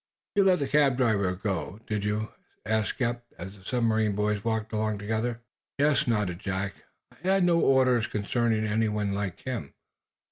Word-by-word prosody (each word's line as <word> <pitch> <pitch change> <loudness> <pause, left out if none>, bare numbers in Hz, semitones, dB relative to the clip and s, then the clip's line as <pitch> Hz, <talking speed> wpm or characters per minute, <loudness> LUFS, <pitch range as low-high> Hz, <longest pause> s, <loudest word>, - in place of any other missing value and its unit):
"You 200 -2 +4
let 185 -2 +5
the 140 - -1
cab 140 -2 +3
driver 100 -7 +2
go, 95 -2 -3
did 105 -2 -2
you!" 105 +1 -1 0.4
asked 110 +3 0
Eph, 120 0 -1 0.2
as 95 +3 -8
the 95 - -18
submarine 110 -2 +1
boys 105 0 0
walked 110 -1 -2
along 110 -1 0
together. 110 +3 -2 0.4
"Yes," 145 -1 +3
nodded 105 -7 0
Jack. 95 -1 -2 0.4
"I - - -21
had 195 0 +4
no 170 -1 +4
orders 130 -5 +4
concerning 110 0 0
anyone 105 -2 0
like 100 -3 -3
him. 120 - -5
110 Hz, 165 wpm, -28 LUFS, 100-120 Hz, 0.4 s, let